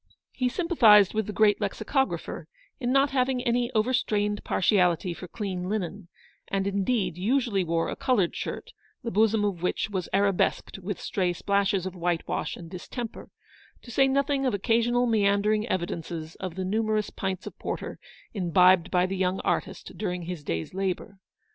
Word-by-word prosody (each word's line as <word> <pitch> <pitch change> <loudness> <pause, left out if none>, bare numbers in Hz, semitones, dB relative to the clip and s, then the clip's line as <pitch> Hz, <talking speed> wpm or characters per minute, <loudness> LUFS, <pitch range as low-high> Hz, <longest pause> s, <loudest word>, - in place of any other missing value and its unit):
He 255 -1 0
sympathised 235 - +5
with 220 -1 -1
the - - -3
great 210 0 +3
lexicographer 265 +7 -2 0.3
in 245 -2 -1
not 275 +1 +3
having 255 -1 +1
any 240 0 +1
overstrained 210 -3 +1
partiality 180 -2 +2
for 180 - -9
clean 185 -2 -4
linen, 200 -2 -3 0.4
and, 195 -1 -1
indeed, 200 -2 0
usually 225 -2 +1
wore 165 -1 0
a - - -3
coloured 250 -10 +1
shirt, - - -5 0.3
the 230 - -3
bosom 215 0 +3
of 190 -5 -2
which 180 +3 -1
was 185 -3 -3
arabesqued 195 -1 +1
with 195 +1 -5
stray 180 -3 -1
splashes 200 +1 +1
of 190 - -4
whitewash 175 -1 -2
and 170 -1 -10
distemper, 225 +5 -7 0.5
to 240 - -10
say 270 +3 +4
nothing 275 +1 +1
of 240 - +1
occasional 235 +4 +2
meander 205 -2 +3
ing 215 +1 -1
evidences 170 -3 -3
of 185 -3 -5
the 190 0 -3
numerous 215 +1 0
pints 190 -1 -4
of - - -8
porter - - -5 0.3
imbibed 180 -2 +4
by 180 -1 +3
the 190 +1 -3
young 185 0 0
artist - - -2
during 180 -4 -2
his 170 -3 -6
day's 80 - -3
labour. 195 0 -3
200 Hz, 160 wpm, -27 LUFS, 180-230 Hz, 0.5 s, sympathised